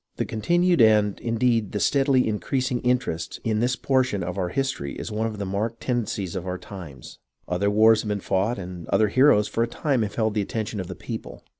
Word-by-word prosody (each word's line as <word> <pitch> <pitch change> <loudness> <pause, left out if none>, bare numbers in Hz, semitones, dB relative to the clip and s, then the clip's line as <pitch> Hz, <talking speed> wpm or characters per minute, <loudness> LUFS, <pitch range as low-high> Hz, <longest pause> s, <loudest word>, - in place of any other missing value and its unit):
The - - -2
continued, 175 - +2
and, 105 -2 +4
indeed, 115 -2 0
the 105 - -1
steadily 135 +2 +3
increasing, 125 +4 -1
in 125 0 +4
terest 85 -9 -5
in 110 -1 0
this 125 +2 +1
portion 130 -7 0
of 90 +1 -4
our 90 -3 -1
history 130 - -2
is - - -6
one 110 +1 -1
of 110 -1 -6
the 100 - -3
marked 105 +4 -2
tendencies 105 -7 -2
of 95 0 -4
our 90 0 -2
times. 85 -11 -10 0.3
Other 90 +3 0
wars 110 +1 +5
have 105 - -5
been 105 -1 -1
fought 100 +5 0
and 90 -3 -7
other 105 +1 +2
heroes 130 -3 +4
for 115 - -2
a 115 - +2
time 135 0 0
held 110 +1 -1
the 105 - 0
attention 105 +1 -3
of 95 - -4
the 90 - -7
people. - - -7
110 Hz, 210 wpm, -24 LUFS, 100-125 Hz, 0.3 s, wars